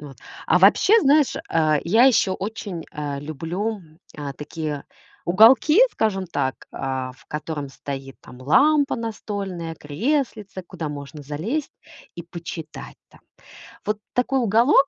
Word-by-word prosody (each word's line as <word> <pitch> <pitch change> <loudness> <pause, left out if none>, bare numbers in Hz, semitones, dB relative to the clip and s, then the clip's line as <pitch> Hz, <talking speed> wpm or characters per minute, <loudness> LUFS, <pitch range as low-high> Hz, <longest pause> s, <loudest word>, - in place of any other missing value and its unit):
Вот. 145 -3 -10 0.3
А - - +4
вообще, 200 - +5
знаешь, 290 -3 +4
а, 155 -2 +3
я 220 +8 +5
ещё 205 -7 +3
очень, 200 -4 -5
а, 145 -2 -4
люблю, 170 +9 -3 0.4
а, 145 -2 -5
такие 150 -1 -5 0.4
уголки, 235 - +6
скажем 195 -4 0
так, 130 -6 -3
а, 130 -1 -3
в 135 - -22
котором 150 -1 -4
стоит 135 0 -7
там 125 - -14
лампа 280 - +3
настольная, 200 -7 -5
креслице, 205 - -2
куда 170 -3 -6
можно 145 +1 -8
залезть 175 - -3 0.4
и 170 - -5
почитать 170 -2 -8
там. - - -20 0.7
Вот 210 0 -1
такой 260 +2 +1
уголок 240 +5 +4
175 Hz, 130 wpm, -23 LUFS, 150-225 Hz, 0.7 s, уголки